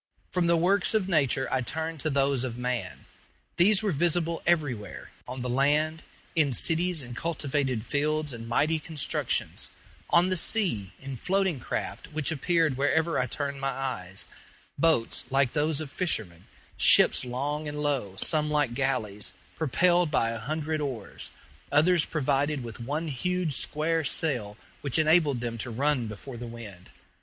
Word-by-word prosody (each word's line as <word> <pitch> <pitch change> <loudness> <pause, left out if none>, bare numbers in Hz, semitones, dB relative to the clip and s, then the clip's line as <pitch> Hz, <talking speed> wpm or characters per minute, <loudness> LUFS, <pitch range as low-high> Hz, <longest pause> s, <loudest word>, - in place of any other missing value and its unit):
From 180 -2 +1
the 170 0 +4
works 190 +5 +2
of 205 -4 +1
nature 140 -6 +2
I 130 - +1
turned 160 +5 -4
to 155 - -1
those 135 -2 +1
of 120 -2 -4
man. 125 -1 -3 0.5
These 195 +4 +5
were 205 - +1
visible 170 +1 +1
everywhere: 145 -11 -1 0.2
on 125 +1 -6
the - - -2
land, 150 +5 +1 0.3
in 150 -5 +3
cities 165 +3 +2
and 120 -1 -8
cultivated 140 -6 -2
fields 150 +1 -1
and 115 -1 -8
mighty 155 +7 +2
constructions; 150 -1 -2 0.4
on 175 +2 +4
the 185 - +2
sea, 155 - +1
in 135 -1 -7
floating 190 -1 0
craft, - - -5
which 155 0 -1
appeared 160 -2 +1
wherever 160 +4 +1
I 125 - 0
turned 140 +2 -4
my 135 - 0
eyes 125 -9 -4 0.5
boats 155 -7 +1
like 135 -1 +2
those 150 0 +1
of 155 -4 -6
fishermen, 105 - -1 0.3
ships - - +6
long 145 +5 -3
and 150 0 -5
low, 135 -10 -1
some 150 - +2
like 150 -5 +1
galleys, 120 -6 -1 0.2
propelled 175 +3 +2
by 115 -6 +1
a 115 - -4
hundred 155 +5 -2
oars, 135 -6 -5 0.4
others 160 +3 +4
provided 145 -1 0
with 115 -1 -8
one 145 +7 -3
huge 175 +4 -1
square 160 +4 0
sail, 125 -9 0 0.2
which 140 -1 0
enabled 155 -5 +3
them 115 -1 -4
to 120 - -1
run 130 0 0
before 115 +4 -8
the 120 +1 -6
wind. 110 -6 -10
145 Hz, 155 wpm, -27 LUFS, 125-160 Hz, 0.5 s, ships